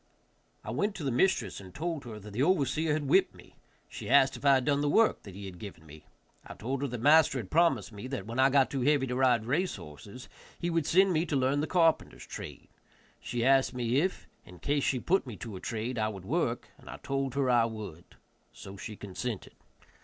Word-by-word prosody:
I 110 - -5
went 195 - -1
to 145 -8 -2
mistress 120 - +1
and 95 -2 -13
told 160 -3 -3
her 110 -3 -7
that 105 +1 -11
the 120 - -1
overseer 155 -1 +2
had 150 -2 -2
whipped 190 +7 +3
me; - - -17 0.3
she - - -8
asked 135 0 +5
if - - -10
I 140 -1 +6
had 130 -1 0
done 145 -1 +2
the 145 - +1
work 225 +9 +3
that 100 -3 -11
he 100 0 -8
had 90 -2 -9
given 90 -5 -10
me. 75 -2 -14 0.4
I - - -10
told 130 +4 -3
her 140 - 0
that 125 -2 -5
master 150 0 +5
had 110 -7 -6
promised 170 -5 +2
me 105 +4 -8
that, 130 -8 -5
when 115 +3 -5
I 135 +1 +6
got 135 -1 +3
too 135 - -2
heavy 140 +1 +3
to 125 -1 -3
ride 125 -4 +3
race 165 +10 0
horses, 100 - -11 0.3
he 175 - -2
would 165 -2 0
send 190 +2 +4
me 160 0 +2
to 150 - -1
learn 135 +2 +1
the 155 - -2
carpenter's 165 -3 +1
trade; - - -9 0.5
she 120 -1 -3
asked 135 -1 +3
me 120 0 0
if, 180 +6 -1 0.2
in 90 - -14
case 140 +7 -1
she 130 - +1
put 180 +2 +1
me 120 - -6
to 115 -4 -7
a - - -6
trade, 115 +3 -4
I 110 - +1
would 100 -4 -7
work, - - -1
and - - -14
I - - -7
told 135 -1 -3
her 140 -2 +1
I 120 -2 +4
would. 105 -7 -8 0.4
So 100 0 -11
she 105 +2 -7
consented. 105 +2 -6
130 Hz, 230 wpm, -30 LUFS, 110-145 Hz, 0.5 s, I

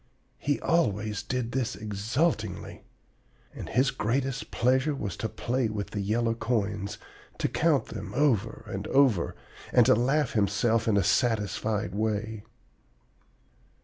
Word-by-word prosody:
He 145 0 0
always 105 - +1
did 125 -2 -3
this 125 -1 -1
exultingly. 110 +10 -2 0.7
And - - -7
his 130 +2 +2
greatest 130 +3 -1
pleasure 130 +5 +2
was 100 -9 -4
to 110 - -2
play 125 +1 -1
with 105 -2 -4
the 100 - -2
yellow 115 +3 +1
coins, 105 -4 -2 0.4
to - - 0
count - - +2
them - - -6
over 135 -7 +1
and - - -5
over, 130 -11 +3 0.4
and - - +6
to - - +6
laugh 135 +6 +2
to 110 - +1
himself 110 +3 +1
in 105 -2 +3
a 100 - +3
satisfied 105 -1 0
way. 110 0 -2
115 Hz, 135 wpm, -28 LUFS, 105-130 Hz, 0.7 s, and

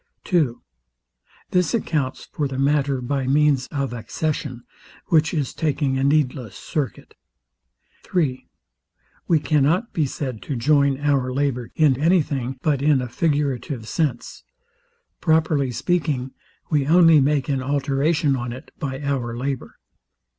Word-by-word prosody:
2. 155 -10 0 0.9
This 180 +5 +2
accounts 150 - -2
for 145 - -1
the 135 -1 -5
matter 140 -1 +1
by 130 +1 -2
means 140 -2 +3
of 140 -3 -3
accession; 130 +1 -3 0.5
which 160 -1 +3
is 145 -6 -2
taking 145 -3 0
a - - 0
needless 135 -6 +1
circuit. 135 - -4 0.9
3. 145 -8 -1 0.8
We 165 - +4
cannot 150 - +1
be 155 -4 +1
said 130 -4 -5
to 140 - -4
join 140 +2 +2
our 140 -3 +1
labour 130 -3 -1
to 155 - +3 0.2
any 165 +2 +4
thing 135 -2 -4
but 145 -4 +1
in 145 -1 +4
a 125 - -3
figurative 140 -4 -1
sense. 140 -6 -2 0.8
Properly 160 -4 +2
speaking, 140 -2 -1 0.4
we 145 -3 +2
only 165 -2 +6
make 140 -1 +1
an 135 -2 0
alteration 140 +2 +1
on 120 -1 -4
it 130 +3 -10
by 135 -1 -4
our 125 -4 -2
labour. 135 +1 -4
140 Hz, 130 wpm, -22 LUFS, 130-155 Hz, 0.9 s, only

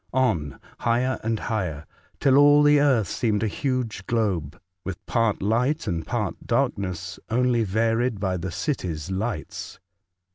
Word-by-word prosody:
On, 90 - 0 0.2
higher 125 +2 +1
and 115 0 -1
higher, 90 -10 -3 0.3
till 135 -1 +4
all 145 +1 +7
the 145 0 +6
earth 130 -8 +3
seemed 110 0 0
a - - +2
huge 120 -4 -2
globe, 90 -8 -1 0.2
with 95 -3 -6
part 115 -5 +1
light 125 +9 +1
and 85 -6 -3
part - - -3
dark - - +2
ness, 90 -1 -5
only 120 0 +2
varied 115 +2 +1
by 95 -2 -1
the 90 +2 -4
cities' 90 - -3
lights. 95 -3 -4
110 Hz, 145 wpm, -25 LUFS, 95-125 Hz, 0.3 s, all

